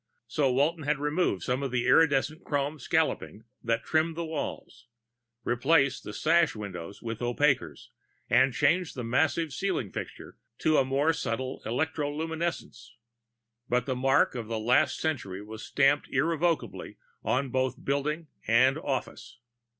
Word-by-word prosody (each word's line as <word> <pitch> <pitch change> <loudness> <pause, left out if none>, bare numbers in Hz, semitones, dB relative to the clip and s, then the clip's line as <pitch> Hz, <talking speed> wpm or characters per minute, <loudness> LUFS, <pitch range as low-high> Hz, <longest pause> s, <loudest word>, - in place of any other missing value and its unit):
So 135 +3 +1
Walton 150 +6 +1
had 150 0 +1
removed 150 - 0
some 125 +2 -1
of 135 - -2
the 120 -1 -1
iridescent 155 +1 +3
chrome 145 +1 -2
scalloping 110 -3 -1 0.2
that 115 0 0
trimmed 160 +1 +1
the 170 - -2
walls, 155 -5 -6 0.6
replaced 135 +3 +2
the - - -6
sash 165 +5 +2
windows 100 -3 -7
with 115 -1 -5
opaquers, 130 +3 0 0.4
and 130 +2 +4
changed 160 +7 +1
the 125 - -4
massive 145 +5 +1
ceiling 180 - -2
fixture - - -8 0.2
to 155 -3 +3
more 140 +5 +1
subtle 130 -3 -3
electroluminescents. 160 0 -3 0.8
But 125 0 +1
the 130 - -1
mark 135 +2 +3
of 115 -3 -5
the 115 0 -2
last 125 +7 +2
century 105 -12 -3
was 110 +1 -9
stamped 140 +1 +2
irrevocably 165 +4 -1 0.3
on 130 +1 0
both 130 +4 -1
building 150 +4 -1 0.2
and 130 +6 +4
office. 130 -4 -4
140 Hz, 135 wpm, -28 LUFS, 120-155 Hz, 0.8 s, and